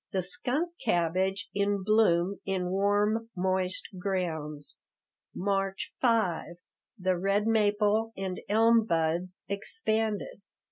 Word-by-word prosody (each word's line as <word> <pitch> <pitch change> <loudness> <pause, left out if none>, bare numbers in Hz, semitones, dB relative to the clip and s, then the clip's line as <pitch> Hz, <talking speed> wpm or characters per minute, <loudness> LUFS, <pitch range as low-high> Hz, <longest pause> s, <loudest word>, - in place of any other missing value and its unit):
The 190 -1 0
skunk 270 - 0
cabbage 190 +4 0
in 200 -1 0
bloom 200 -3 +3
in 185 -2 -2
warm, 205 +3 +1
moist 185 0 0
grounds. 160 -6 -3 0.6
March 195 0 -1
5 190 -9 +1 0.4
The 185 -2 0
red 195 +3 +1
maple 215 0 +2
and 190 -1 -4
elm 225 +1 +4
buds 170 +1 0
expanded. 220 - -2
195 Hz, 100 wpm, -29 LUFS, 180-215 Hz, 0.6 s, elm